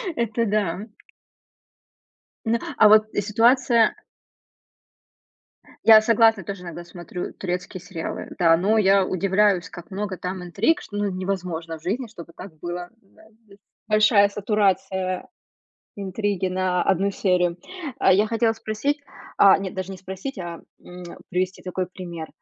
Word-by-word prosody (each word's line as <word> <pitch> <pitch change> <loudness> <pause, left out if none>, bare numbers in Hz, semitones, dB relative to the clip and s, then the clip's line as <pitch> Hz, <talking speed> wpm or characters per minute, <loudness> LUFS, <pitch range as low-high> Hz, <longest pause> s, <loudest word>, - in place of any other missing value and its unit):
Это 230 0 0
да. 205 -1 -1 1.6
Н - - +3
а - - -5
а, 215 - +7
вот, 215 0 +7
э, - - 0
ситуация. 230 +2 +3 1.9
Я 220 -1 +9
согласна, 225 -2 +4
тоже 195 -1 -7
иногда 175 0 -7
смотрю 175 0 -7
турецкие 180 0 -5
сериалы, 175 -3 -6
да. 165 -2 +5
Но 205 +6 +2
я 195 -2 +4
удивляюсь, 190 -1 +1
как 175 +3 -12
много 195 -1 -4
там 180 0 -5
интриг, 225 - +1
что, 205 - -8
ну, 205 0 0
невозможно 180 -3 -4
в 160 - -22
жизни, 235 +7 -2
чтобы 170 -6 -12
так 180 -4 -11
было, 175 +1 -5
да 195 +2 -23 0.2
д 200 - -18 0.3
Большая 215 -1 +5
сатурация 195 -2 -1 0.7
интриги 200 -1 -2
на 185 -1 0
одну 195 +1 +1
серию. 180 -3 +1 0.4
А, 190 - +4
я 205 +3 +4
хотела 225 0 +1
спросить, 250 +7 -2 0.4
а, 195 -1 +7
нет, 195 -1 -5
даже 190 0 -4
не 190 - -8
спросить, 190 +7 -7
а, 170 -2 -6 0.2
м, 180 0 -11 0.3
привести 185 +1 -2
такой 185 -1 -3
пример. 175 -3 -8
190 Hz, 140 wpm, -23 LUFS, 180-210 Hz, 1.9 s, Я